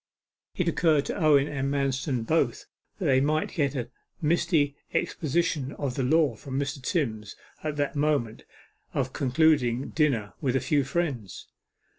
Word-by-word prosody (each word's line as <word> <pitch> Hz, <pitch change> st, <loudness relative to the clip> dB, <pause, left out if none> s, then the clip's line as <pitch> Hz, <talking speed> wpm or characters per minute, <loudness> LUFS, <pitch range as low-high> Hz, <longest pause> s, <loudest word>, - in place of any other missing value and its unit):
It -, -, 0 dB
occurred 155 Hz, -4 st, +3 dB
to -, -, -3 dB
Owen 150 Hz, -3 st, +4 dB
and 140 Hz, -2 st, -2 dB
Manston 135 Hz, -3 st, -1 dB
both 140 Hz, -4 st, +1 dB, 0.3 s
that 190 Hz, -, -4 dB
they 130 Hz, -3 st, +4 dB
might 155 Hz, +2 st, 0 dB
get 145 Hz, -3 st, 0 dB
a 120 Hz, -1 st, -4 dB, 0.3 s
misty 155 Hz, -3 st, +2 dB, 0.2 s
exposition 155 Hz, -3 st, 0 dB
of 140 Hz, -4 st, -3 dB
the 135 Hz, -, -2 dB
law 145 Hz, +1 st, +3 dB
from 135 Hz, +4 st, -4 dB
Mr. 140 Hz, 0 st, -3 dB
Timms 115 Hz, -, -2 dB, 0.3 s
at 155 Hz, -1 st, -2 dB
that 145 Hz, 0 st, -1 dB
moment 145 Hz, -7 st, 0 dB, 0.5 s
of 130 Hz, -1 st, -1 dB
concluding 135 Hz, -3 st, +2 dB
dinner 135 Hz, -10 st, 0 dB
with 135 Hz, -4 st, 0 dB
a -, -, +3 dB
few 145 Hz, +3 st, +1 dB
friends. 135 Hz, -, -3 dB
140 Hz, 150 wpm, -27 LUFS, 130-155 Hz, 0.5 s, Owen